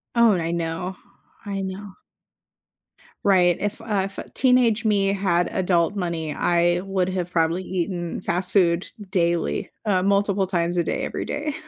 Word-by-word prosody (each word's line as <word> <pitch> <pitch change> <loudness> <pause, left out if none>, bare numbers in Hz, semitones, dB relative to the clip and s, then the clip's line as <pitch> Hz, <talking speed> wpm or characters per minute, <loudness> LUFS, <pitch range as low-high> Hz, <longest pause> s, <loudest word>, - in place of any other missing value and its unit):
Oh, 235 -1 +6
and 180 - 0
I 165 +1 -2
know. 170 +2 -3 0.5
I 200 -1 -3
know. 190 +1 -6 1.3
Right. 180 -3 +4
If, 205 +1 -3
uh 200 -4 -1
If 195 - -15 0.2
teenage 245 -3 +3
me 200 -2 +3
had 185 -3 +1
adult 180 -1 +1
money, 165 -4 -2
I 175 0 +2
would 190 -2 0
have 180 -2 -2
probably 170 +1 +1
eaten 175 -2 -3
fast 180 +2 -2
food 175 -3 +3 0.2
daily, 170 -2 0 0.2
uh, 195 -4 +2
multiple 200 0 +2
times 175 -1 -1
a 170 - +3
day, - - -2
every - - -3
day. 300 0 -3
185 Hz, 155 wpm, -23 LUFS, 170-200 Hz, 1.3 s, Oh